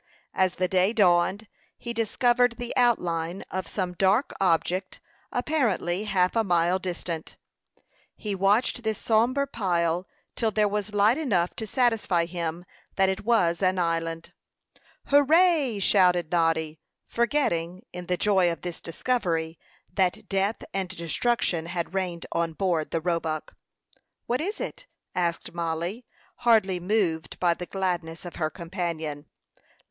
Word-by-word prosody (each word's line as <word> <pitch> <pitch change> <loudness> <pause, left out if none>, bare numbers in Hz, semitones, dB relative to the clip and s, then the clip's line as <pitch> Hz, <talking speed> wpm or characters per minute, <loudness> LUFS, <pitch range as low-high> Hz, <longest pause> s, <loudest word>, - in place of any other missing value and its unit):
As 185 -1 +1
the 185 - 0
day 185 +3 +2
dawned, 190 +1 +3 0.3
he 235 - -5
discovered 240 +2 +2
the 245 -1 -4
outline 180 -8 +1
of 185 -2 -3
some 185 -1 -3
dark 195 +8 +2
object, 185 +1 +1 0.3
apparently 230 - 0
half 185 -2 +1
a 225 - +3
mile 175 -1 +2
distant. 175 -3 -4 0.8
He 210 -2 -3
watched 200 +6 +2
this 220 -2 -1
sombre 240 +5 +2
pile 175 -6 -1 0.3
till 225 - +1
there 215 0 +2
was 210 0 -3
light 215 +7 +4
enough 185 - 0
to 220 - -4
satisfy 225 -9 +2
him 170 0 -4 0.3
that 190 0 +3
it 190 - -2
was 180 -7 +2
an 185 0 +2
island. 165 -1 -2 0.7
"Hurrah!" 290 - +4
shouted 180 -4 +3
Noddy, 160 -2 +1 0.3
forgetting, 190 - 0
in 180 -1 -7
the 180 - 0
joy 190 -4 +3
of 165 - -6
this 175 -2 -5
discovery, 165 -4 -1 0.3
that 185 -2 0
death 195 +2 0
and 190 -2 -2
destruction 170 0 -1
had 175 0 -3
reigned 180 -3 -2
on 170 -1 -1
board 170 -3 0
the 165 - -1
Roebuck. 165 -2 -2 0.7
"What 245 +3 -1
is 400 +6 -3
it?" - - -6 0.3
asked 170 -2 -2
Mollie, 170 +7 -3 0.3
hardly 210 -6 +3
moved 175 -4 -1
by 175 -2 +3
the 180 +1 -7
gladness 175 -3 -3
of 175 - -8
her 155 -2 0
companion. 165 -4 -4
185 Hz, 135 wpm, -26 LUFS, 170-220 Hz, 0.8 s, light